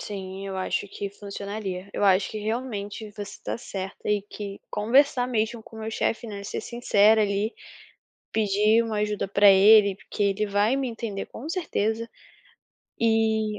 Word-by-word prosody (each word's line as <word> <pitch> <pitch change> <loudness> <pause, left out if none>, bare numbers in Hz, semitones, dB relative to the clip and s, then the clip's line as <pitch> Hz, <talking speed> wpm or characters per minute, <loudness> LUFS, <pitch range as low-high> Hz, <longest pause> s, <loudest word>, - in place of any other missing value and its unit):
Sim, 195 -1 -6
eu 195 -1 -5
acho 190 +2 -2
que 200 +1 -5
funcionaria. 200 -1 -6
Eu - - -1
acho 190 0 +4
que 215 - -5
realmente 215 -1 -4
você 205 0 -6
está 205 - -6
certa 195 -4 -6
e 210 -1 +2
que 200 -1 -8
conversar 250 +3 +3
mesmo 225 -1 -1
com 225 - -14
meu 220 0 -4
chefe, 230 +1 -1
né, 200 -2 -6
ser 200 - -4
sincera 220 -2 +3
ali, 205 +2 0 0.8
pedir 215 +1 +3
uma 225 -2 -3
ajuda 210 -1 -1
para 200 +1 +6
ele, 200 +1 +7
porque 205 - -4
ele 200 +1 +1
vai 205 +4 +2
me 270 -1 -1
entender, 225 -4 -4
com 270 - -9
certeza, 230 - -1 0.9
e 220 -2 +1
210 Hz, 160 wpm, -25 LUFS, 200-225 Hz, 0.9 s, ele